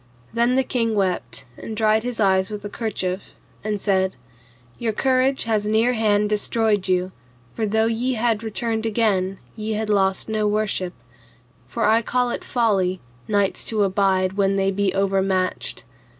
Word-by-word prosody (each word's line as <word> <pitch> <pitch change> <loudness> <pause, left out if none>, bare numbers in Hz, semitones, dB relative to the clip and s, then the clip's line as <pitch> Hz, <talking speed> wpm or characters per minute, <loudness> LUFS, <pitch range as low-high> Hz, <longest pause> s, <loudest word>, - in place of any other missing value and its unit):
Then 235 +2 +2
the 265 - +3
king 230 -3 0
wept, 190 -8 -2
and 220 - -7
dried 215 0 +3
his 245 0 -4
eyes 190 -2 +3
with 210 -1 -6
a - - -4
kerchief, 195 -4 -4 0.3
and 210 -1 -2
said, 190 -1 +1 0.6
Your 225 -2 -1
courage 265 +3 +2
had 215 -2 0
near 220 +4 +2
hand 210 -2 +2
destroyed 210 -1 +1
you, 185 0 +1 0.4
for 220 -2 -1
though 220 +2 +2
ye 235 +3 0
had 225 -2 0
returned 225 0 -2
again, 200 -4 +1 0.2
ye 220 0 -3
had 215 0 -1
lost 190 -2 +2
no 215 -1 0
worship; 205 -4 -1 0.7
for 125 - -2
I 220 +2 +4
call 245 +1 0
it - - -4
folly, 195 -6 +1 0.3
knights 205 -2 0
to 215 -2 +1
abide 190 -1 +2
when 195 0 +1
they 195 0 +1
be 200 0 0
overmatched. 190 -1 0
210 Hz, 160 wpm, -22 LUFS, 195-225 Hz, 0.7 s, I